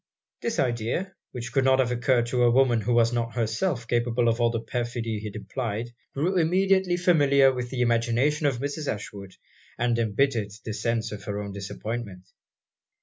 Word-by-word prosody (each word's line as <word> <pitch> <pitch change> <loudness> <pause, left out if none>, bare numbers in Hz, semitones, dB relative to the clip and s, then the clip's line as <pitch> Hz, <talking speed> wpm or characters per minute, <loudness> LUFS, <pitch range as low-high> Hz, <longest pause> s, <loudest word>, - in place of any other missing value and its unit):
This 230 -1 -2
idea, 125 - -1 0.2
which 120 -1 -6
could 135 - +3
not 130 0 +4
have 130 -2 +1
occurred 120 0 +2
to 125 +1 -1
a 120 - +5
woman 120 -2 +3
who 115 +4 -2
was 115 0 +3
not 115 0 -2
herself 115 - -1
capable 120 0 +1
of 115 +1 0
all 120 - +4
the 115 -1 -2
perfidy 115 -1 -3
it 105 -1 -6
implied, 115 +1 -4 0.2
grew 175 +7 +1
immediately 185 +2 +2
familiar 140 -6 +4
with 125 -1 -4
the 125 -1 -2
imagination 120 +6 +2
of 135 -4 0
Mrs. 145 +3 -3
Ashwood, 100 -2 -8 0.4
and 120 -1 +1
embittered 110 -1 0
the 110 - -3
sense 115 0 -1
of 105 -2 -8
her 105 -1 -3
own 100 -1 -5
disappointment. 100 -1 -6
120 Hz, 175 wpm, -26 LUFS, 115-135 Hz, 0.4 s, a